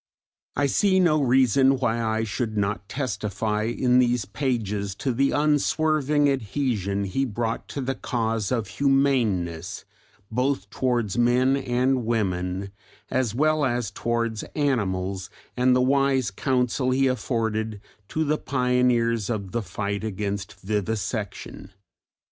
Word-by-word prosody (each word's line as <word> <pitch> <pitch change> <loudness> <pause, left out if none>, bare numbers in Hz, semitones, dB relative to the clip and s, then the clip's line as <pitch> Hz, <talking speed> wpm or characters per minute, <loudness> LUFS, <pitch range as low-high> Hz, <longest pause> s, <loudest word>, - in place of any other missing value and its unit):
I 145 - +2
see 190 +7 +3
no 155 -5 +3
reason 130 +1 +4
why 120 -2 0
I 110 0 0
should 110 0 -3
not 100 -1 -1
testify 105 -4 -2
in 125 +2 +2
these 120 -3 +2
pages 105 -4 -2
to 130 +3 -2
the 135 +3 +2
unswerving 150 0 +2
adhesion 110 -6 -1
he 100 +8 -1
brought 115 -2 -2
to 140 - -5
the 135 +1 -1
cause 115 -5 -2
of 115 -5 0
humaneness 115 -12 0 0.5
both 125 -4 -1
towards 120 -4 0
men 125 +3 +3
and 130 -1 +1
women 95 -4 -1 0.4
as 120 -4 0
well 155 +2 +2
as 120 -5 0
towards 115 0 -1
animals, 95 -9 -1 0.3
and 125 0 +3
the 125 - +3
wise 135 -3 +2
counsel 125 +3 0
he 135 +1 +2
afforded 110 -4 -1 0.3
to 160 - -1
the 150 0 0
pioneers 125 -4 +1
of 100 -5 -3
the 120 - -1
fight 100 +2 -3
against 100 -2 -4
vivisection. 105 -1 -3
120 Hz, 125 wpm, -25 LUFS, 105-135 Hz, 0.5 s, reason